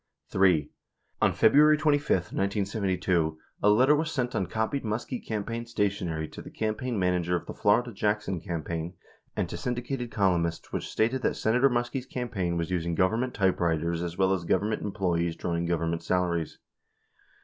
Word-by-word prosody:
3. 90 -6 +3 0.5
On - - +4
February 150 +6 +5
25. 145 - +1
1972, 95 -5 0 0.2
a 105 - +4
letter 130 +8 +5
was 155 +1 -1
sent 125 -4 -1
on 95 - -1
copied 110 +8 -1
Muskie 115 +3 -3
cam 110 -2 -3
paign 115 +2 -5
stationery 95 -8 -1
to - - -10
the - - -10
campaign 110 +2 -2
manager 90 -2 +1
of 85 - -3
the - - -6
Florida 120 +3 +2
Jackson 105 -3 -1
campaign 85 0 -4 0.4
and - - -1
to - - -6
syndicated 125 0 -3
columnists 85 -6 0
which - - -3
stated 120 +4 +1
that - - 0
Senator 125 +5 +3
Muskie's 120 +1 -2
campaign 100 -9 -2
was 85 +1 -2
using 85 -1 -1
Government 110 +8 +1
typewriters 85 -3 +1
as 85 -1 -4
well 95 0 +3
as 90 -3 -2
Government 105 +6 0
employees 85 -5 -1
drawing 85 0 -2
Government 85 -1 -1
salaries. 85 -2 -1
95 Hz, 160 wpm, -28 LUFS, 85-115 Hz, 0.5 s, February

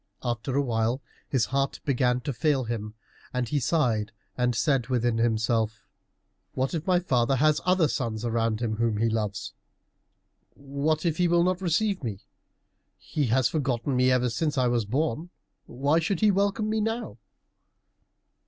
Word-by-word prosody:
After 120 +2 -2
a 140 - +3
while 115 0 0 0.3
his 130 -4 +2
heart 135 +1 -1
began 125 -2 +1
to 140 - -3
fail 135 +2 +1
him, 110 -2 -5 0.4
and 125 -1 0
he 145 +4 0
sighed 120 -8 +1 0.2
and 125 -1 +1
said 135 0 +1
within 120 -2 +1
himself, 110 -1 0 0.7
"What 130 +4 -1
if 165 +1 -3
my 180 -1 +4
father 130 -6 +1
have 150 +3 +3
other 180 -3 +4
sons 115 -6 -3
around 115 -1 0
him, 110 -2 -1
whom 115 -2 +1
he 115 +2 +2
loves? 105 -2 -3 1.0
What 140 +4 -2
if 165 -2 +1
he 180 - +3
will 170 0 +3
not 185 +1 0
receive 190 +1 0
me? 105 -5 -4 0.8
He 145 -4 -2
has 120 +2 +3
forgotten 135 -3 -1
me 125 0 +4
ever 125 -1 +2
since 150 +4 -1
I 130 -1 +3
was 120 -3 +1
born. 150 - -1 0.4
Why 140 +6 +1
should 165 +2 -1
he 215 -1 +5
welcome 200 +2 +1
me 220 0 0
now?" 225 - -3
130 Hz, 160 wpm, -27 LUFS, 115-155 Hz, 1.0 s, he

